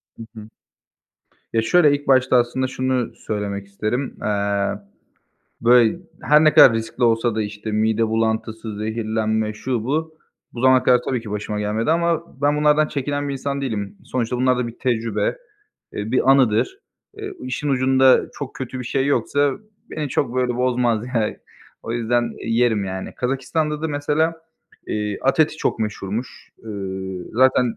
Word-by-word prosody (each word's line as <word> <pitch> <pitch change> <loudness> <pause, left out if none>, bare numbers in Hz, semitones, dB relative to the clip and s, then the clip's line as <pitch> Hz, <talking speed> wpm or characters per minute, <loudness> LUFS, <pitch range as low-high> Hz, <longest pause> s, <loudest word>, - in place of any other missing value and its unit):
Hı 115 - -9
hı. 110 -1 -9 1.1
Ya, 115 - +3
şöyle, 150 +5 +4
ilk 145 0 -8
başta 130 -1 +4
aslında 120 +2 +1
şunu 130 -2 -1
söylemek 100 -3 -4
isterim. 110 +7 -3
Eee, 100 -1 -1 0.8
böyle, 120 +5 +5 0.2
her 150 +1 +5
ne 155 - +4
kadar 120 - +9
riskli 115 +2 -2
olsa 115 0 +2
da, 110 - 0
işte, 105 +1 -6
mide 110 +1 +1
bulantısı, 110 -1 -2
zehirlenme, 110 0 -1
şu 115 0 -3
bu, 155 +4 -2 0.3
bu 120 - -7
zamana 130 0 +5
kadar 125 -1 +4
tabii 130 -3 0
ki, 110 -2 -9
başıma 105 0 -3
gelmedi 110 +6 -1
ama 170 -2 0
ben 145 +1 +3
bunlardan 150 0 +3
çekinen 145 0 -2
bir - - -2
insan 140 +1 -3
değilim. 105 -7 -4
Sonuçta 125 -1 -2
bunlar 130 0 +2
da 125 - -1
bir 115 0 -9
tecrübe, 115 - -1 0.6
eee, 105 +2 -4
bir 130 +1 +3
anıdır. 135 - +3 0.4
Eee, 410 -1 -6
işin 210 - -3
ucunda 130 -1 +4
çok 140 -2 -7
kötü 130 0 -6
bir 125 - -5
şey 135 +3 0
yoksa 145 0 +1 0.4
beni 150 -2 -3
çok, 125 -2 -1
böyle, 125 -1 0
bozmaz, 120 -3 +1
yani. 110 -2 0 0.5
O 115 - -5
yüzden 120 0 0 0.2
yerim, 115 -3 +2
yani. 95 0 -5
Kazakistan'da 150 +4 -2
da 160 - 0
mesela, 150 +3 0 0.5
eee, 105 -1 -2
at 135 +4 +2
eti 155 0 +2
çok - - -1
meşhurmuş. 105 +2 -5
Iıı, 95 -3 -5
zaten 125 -1 +3
120 Hz, 160 wpm, -21 LUFS, 110-135 Hz, 1.1 s, kadar